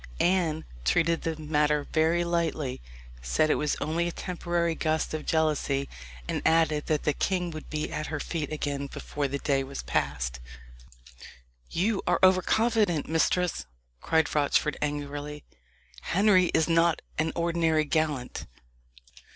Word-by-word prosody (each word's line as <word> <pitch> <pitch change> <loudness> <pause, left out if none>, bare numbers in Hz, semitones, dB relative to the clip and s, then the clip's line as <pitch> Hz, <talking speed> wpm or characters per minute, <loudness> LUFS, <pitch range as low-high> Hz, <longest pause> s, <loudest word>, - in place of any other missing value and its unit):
Anne 170 -4 +1 0.2
treated 165 - +2
the 165 -1 -2
matter 150 -1 +1
very 165 +2 +3
lightly 165 -6 -1 0.4
said - - +2
it - - +1
was 150 - 0
only 165 +3 0
a - - -2
temporary 175 -1 -1
gust 160 -1 -1
of 155 -1 -4
jealousy 150 -3 +1 0.4
and - - -2
added 160 -2 +2
that 155 -2 0
the 150 - +2
king 180 +2 -1
would 155 -1 -8
be 155 0 -3
at 155 - -3
her 155 - -3
feet 155 -1 -3
again 145 -2 -2
before 145 +1 -3
the 140 +1 -3
day 135 -1 0
was 135 +1 -6
past. 65 -4 -1 1.3
"You 195 +4 0
are - - +3
over 185 0 +6
confident, 215 -7 +1
mistress!" 165 - +1 0.3
cried 160 -2 +1
Rochford 150 +1 +2
angrily. 145 0 -4 0.6
"Henry 190 -1 +4
is 160 - +2
not 165 0 +3 0.2
an 160 +1 +1
ordinary 165 -2 +1
gallant." 145 -5 -1
155 Hz, 140 wpm, -27 LUFS, 145-170 Hz, 1.3 s, over